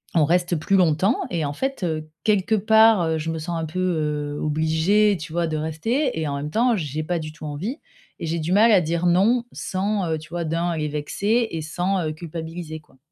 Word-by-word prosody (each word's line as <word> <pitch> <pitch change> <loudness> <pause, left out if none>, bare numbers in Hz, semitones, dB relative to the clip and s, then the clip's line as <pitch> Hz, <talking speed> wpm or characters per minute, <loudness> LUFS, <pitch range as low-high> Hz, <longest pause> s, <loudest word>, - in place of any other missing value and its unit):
on 155 -3 +5
reste 175 +1 +1
plus 195 +6 +1
longtemps 185 - +3 0.2
et 165 -4 -1
en 145 - -3
fait, 270 - -3
heu, 155 -2 -2 0.2
quelque 215 +1 +2
part, 220 -1 +5
heu, 160 0 0
je 165 +1 -3
me 160 - -3
sens 170 +2 -3
un - - -3
peu, 160 +4 -5
heu, 150 -5 -1
obligée 160 +7 +2
tu 155 0 -8
vois 170 -1 0
de 155 - -2
rester 160 - -1
et 155 - -1
en 140 - -2
même 150 +1 -4
temps, 235 +3 +3
j'ai 155 -2 -3
pas 175 +2 -1
du 155 -1 -6
tout 155 0 -10
envie 180 - -4 0.4
et - - -4
j'ai 165 +1 -1
du 160 +3 -2
mal 220 +3 +6
à 185 - +6
dire 170 +2 -1
non 220 +8 +3
sans, 195 0 -1
heu, 160 - 0
tu 155 - -12
vois 170 0 -3
d'un, 165 +2 -1
les 150 -1 -1
vexer 205 +10 0
et 165 - -3
sans, 180 +3 -1
heu, - - -2
culpabiliser 160 0 -7
quoi. 135 -3 -26
170 Hz, 230 wpm, -23 LUFS, 155-195 Hz, 0.4 s, mal